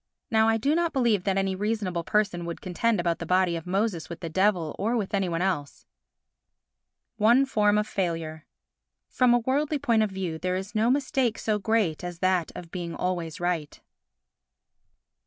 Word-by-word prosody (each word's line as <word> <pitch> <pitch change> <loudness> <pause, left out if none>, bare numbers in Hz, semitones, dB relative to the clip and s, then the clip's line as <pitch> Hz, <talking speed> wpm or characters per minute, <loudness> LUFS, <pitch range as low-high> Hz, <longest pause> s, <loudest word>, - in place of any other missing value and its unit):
Now, 220 0 +4
I 225 - +3
do 275 +7 +1
not 340 0 +1
believe 235 -8 +2
that 195 -1 +1
any 195 0 +1
reasonable 195 -3 -2
person 200 -3 0
would 170 0 -5
contend 205 +4 0
about 170 -1 0
the 170 - -4
body 185 -1 +2
of 165 +1 -6
Moses 190 -2 -1
with 170 - -7
the 165 -2 -6
devil 185 -4 +1
or 230 +4 +1
with 205 -3 -3
any 195 -2 +1
one 170 +1 -1
else. 145 -7 -2 1.3
One 235 +5 +5
Form 210 -5 +2
of 210 - +1
Failure 165 -5 -3 0.6
From 250 -1 +3
a 240 -1 -1
worldly 290 +3 +1
point 235 -6 +2
of 215 - +1
view 185 -4 -4
there 180 +1 -1
is 190 +2 -5
no 220 +1 +2
mistake 260 -3 +1
so 215 -1 -1
great 205 -7 0
as 175 -1 -5
that 185 -2 +1
of 170 -2 -9
being 175 -2 -5
always 175 -3 -3
right. 175 -4 -2
190 Hz, 180 wpm, -26 LUFS, 175-225 Hz, 1.3 s, One